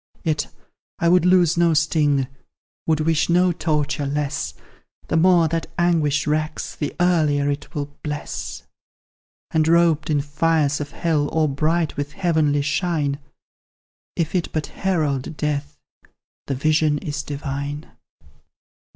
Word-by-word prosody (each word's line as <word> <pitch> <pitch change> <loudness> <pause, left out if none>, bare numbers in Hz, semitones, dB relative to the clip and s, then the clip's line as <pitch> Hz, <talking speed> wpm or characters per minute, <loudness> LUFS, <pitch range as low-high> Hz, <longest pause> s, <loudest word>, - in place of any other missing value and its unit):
"Yet 155 -4 0 0.5
I 170 - +2
would 180 0 +4
lose 180 -2 +4
no 170 -1 +4
sting, 150 -3 +2 0.6
would 155 -1 +2
wish 160 +1 +1
no 180 +1 +4
torture 150 -3 -1
less; 140 - -2 0.5
The - - +1
more 170 0 +5
that 165 0 -2
anguish 160 -5 +2
racks, 155 +1 -2
the 145 - -4
earlier 150 -5 +2
it 145 +4 -6
will 145 -1 -1 0.2
bless; 150 -1 -5 0.9
And 155 -1 +2
robed 165 -2 +3
in 150 -2 +2
fires 150 0 +1
of 145 - -4
hell, 155 -4 0
or 160 -1 +2
bright 155 +3 0
with 145 0 -3
heavenly 155 -6 +1
shine, 150 -2 0 1.0
If 165 -2 -1
it 180 -3 -1
but 155 -2 -2
herald 155 -6 -1
death, 145 -1 -2 0.7
the 135 - -1
vision 155 +2 +2
is 145 0 -4
divine!" 145 0 -4
155 Hz, 130 wpm, -22 LUFS, 145-165 Hz, 1.0 s, more